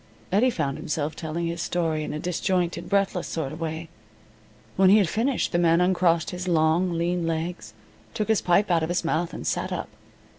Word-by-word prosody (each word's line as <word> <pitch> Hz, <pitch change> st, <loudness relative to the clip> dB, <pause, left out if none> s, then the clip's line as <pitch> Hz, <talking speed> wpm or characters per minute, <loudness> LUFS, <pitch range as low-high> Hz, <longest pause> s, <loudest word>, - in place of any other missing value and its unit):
Eddie 215 Hz, +7 st, +4 dB
found 140 Hz, -, -2 dB
himself 150 Hz, 0 st, -2 dB
telling 165 Hz, +1 st, -3 dB
his 170 Hz, 0 st, -3 dB
story 165 Hz, -3 st, -1 dB
in -, -, -4 dB
a -, -, -3 dB
disjointed, 175 Hz, +1 st, -1 dB
breathless 195 Hz, -3 st, +1 dB
sort 160 Hz, -5 st, -3 dB
of 160 Hz, -, -9 dB
way. 160 Hz, 0 st, -4 dB, 0.9 s
When 190 Hz, 0 st, +5 dB
he 205 Hz, -, +7 dB
had 200 Hz, -4 st, +3 dB
finished 235 Hz, +8 st, 0 dB
the 175 Hz, -, +1 dB
man 170 Hz, -1 st, +4 dB
uncrossed 180 Hz, -2 st, +2 dB
his 180 Hz, 0 st, -5 dB
long 170 Hz, +2 st, +2 dB
lean 170 Hz, 0 st, -1 dB
legs, 160 Hz, -9 st, -4 dB, 0.4 s
took 215 Hz, -, -1 dB
his 220 Hz, -2 st, +2 dB
pipe 185 Hz, +3 st, +2 dB
out 170 Hz, -1 st, +3 dB
of 160 Hz, -, -2 dB
his 175 Hz, -1 st, -1 dB
mouth, 165 Hz, +1 st, 0 dB
and -, -, -7 dB
sat -, -, -1 dB
up. -, -, -4 dB
170 Hz, 195 wpm, -25 LUFS, 160-185 Hz, 0.9 s, he